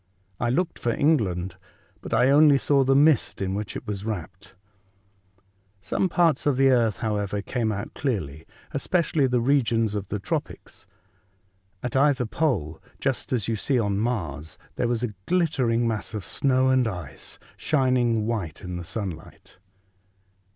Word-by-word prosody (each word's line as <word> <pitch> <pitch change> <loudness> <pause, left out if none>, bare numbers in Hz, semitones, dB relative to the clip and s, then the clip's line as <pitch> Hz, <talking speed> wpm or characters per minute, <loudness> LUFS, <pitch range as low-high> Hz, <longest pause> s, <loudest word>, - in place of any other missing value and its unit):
I 120 - 0
looked 170 +8 -1
for 120 - -1
England, 95 - +1 0.4
but - - -8
I 130 +2 +4
only 145 0 +6
saw 140 0 +2
the 135 +1 +3
mist 145 -2 +3
in 95 -1 -2
which 105 0 -4
it - - -6
was 105 -2 -4
wrapt. 100 -1 -6 1.2
Some 140 - -1
parts 165 -5 +2
of 140 -3 +2
the 135 0 +5
earth, 115 -5 +2
however, 105 -2 -2
came 115 -2 -1
out 100 -1 -5
clearly, 80 - -3 0.2
especially 165 -5 +1
the 125 -1 +1
regions 115 -4 +2
of 100 -2 -3
the 105 - -3
tropics. 100 - -5 1.0
At 125 0 -3
either 135 -2 +3
pole, 105 - -1 0.2
just 135 -4 -2
as 115 -6 0
you 115 - 0
see 130 +5 0
on 100 -3 0
Mars, 80 - -3 0.2
there - - 0
was 120 0 -1
a 115 -3 -2
glittering 135 -10 +1
mass 110 0 -3
of 105 - -4
snow 130 -1 +2
and 130 -2 +3
ice 90 -9 -7 0.2
shining 125 -6 +1
white 100 -9 -3
in 90 -1 -5
the 90 - -6
sunlight. 90 -4 -7
115 Hz, 155 wpm, -25 LUFS, 100-135 Hz, 1.2 s, only